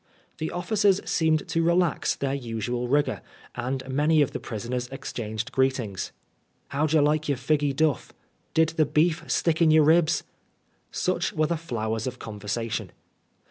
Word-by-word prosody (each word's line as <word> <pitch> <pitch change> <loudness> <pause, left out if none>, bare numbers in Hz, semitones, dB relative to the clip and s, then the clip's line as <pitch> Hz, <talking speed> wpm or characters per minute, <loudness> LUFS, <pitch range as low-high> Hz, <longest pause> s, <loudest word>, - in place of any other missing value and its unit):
The 160 - -2
officers 195 +2 +2
seemed 160 +2 +1
to 165 0 +1
relax 170 -1 +2
their 135 -1 -2
usual 120 -1 -3
rigor, 145 +3 +1 0.3
and 130 +2 -3
many 150 +3 +3
of 140 - -3
the - - -4
prisoners 120 +3 -4
exchanged 115 -2 -5
greetings. 130 -8 0 0.6
"How 145 +3 +1
did 155 - -2
yer 155 - +6
like 150 +1 +2
the 145 - +1
figgy 140 +2 0
duff 155 -3 +1
?" - - -41
" - - -43
Did 160 0 +4
the 160 -1 +2
beef 160 +2 +2
stick 165 -1 +1
in 165 - +6
yer 155 0 +6
ribs?" 160 +2 +4 0.7
Such - - -1
were 155 - +2
the 170 - 0
flowers 115 -7 -3
of 125 -1 -4
conversation. 110 -1 -4
145 Hz, 165 wpm, -26 LUFS, 120-160 Hz, 0.7 s, yer